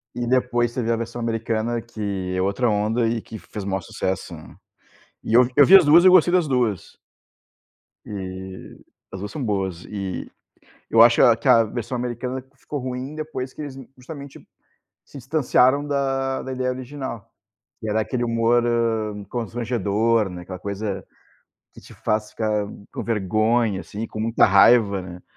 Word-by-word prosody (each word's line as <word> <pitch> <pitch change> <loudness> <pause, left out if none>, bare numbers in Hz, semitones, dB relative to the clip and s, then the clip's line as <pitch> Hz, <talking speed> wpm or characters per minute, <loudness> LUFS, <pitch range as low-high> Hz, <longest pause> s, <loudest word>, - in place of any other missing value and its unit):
e 120 - -2
depois 120 -1 +1
teve 120 -3 -2
a 115 - +3
versão 115 +1 -5
americana, 115 0 -2
que 100 -5 -4
é 95 - 0
outra 100 +6 +1
onda 110 +3 +1
e 115 -1 -2
que 110 - -9
fez 105 -2 -8
maior 95 -1 -2
sucesso, 95 +1 -4
né? 80 - -14 0.7
E - - -3
eu 125 0 +6
eu 145 - +8
vi 185 +7 +8
as 180 - +4
2 160 +4 +7
e - - +7
eu - - +8
gostei 180 -1 +5
das 180 -4 +3
2. 120 -8 -1 1.1
E 95 -2 -8 0.3
as 95 - -7
2 105 +1 -6
são 150 - -5
boas. 95 -6 -2
E 95 -3 -5 0.6
eu 115 - +5
acho 120 0 +6
é 120 - +6
que 115 - -5
a 115 - +6
versão 120 +3 -4
americana 125 +2 -4
ficou 145 +2 -6
ruim 130 +3 -5
depois 150 -4 -5
que - - -9
eles 140 -3 -7 0.2
justamente 140 +2 -10 0.6
se 145 - -12
distanciaram 135 0 +2
da 135 -2 -1
da 130 - -6
ideia 130 0 -1
original, 130 -3 -7 0.5
que 110 - -5
era 110 +1 +1
aquele 120 +2 -2
humor, 115 +1 +2
hã, 110 -3 -1
constrangedor, 115 -2 0
né, 90 -1 -8
aquela 90 +1 -8
coisa 100 0 -4 0.7
que - - -13
te - - -15
faz 105 0 -2
ficar 105 -1 -1 0.3
com - - -4
vergonha, 110 0 +1
assim, 110 +4 -6
com 110 - -8
muita 115 +1 +3
raiva, 100 0 +5
né. 90 -1 -10
115 Hz, 170 wpm, -22 LUFS, 105-125 Hz, 1.1 s, eu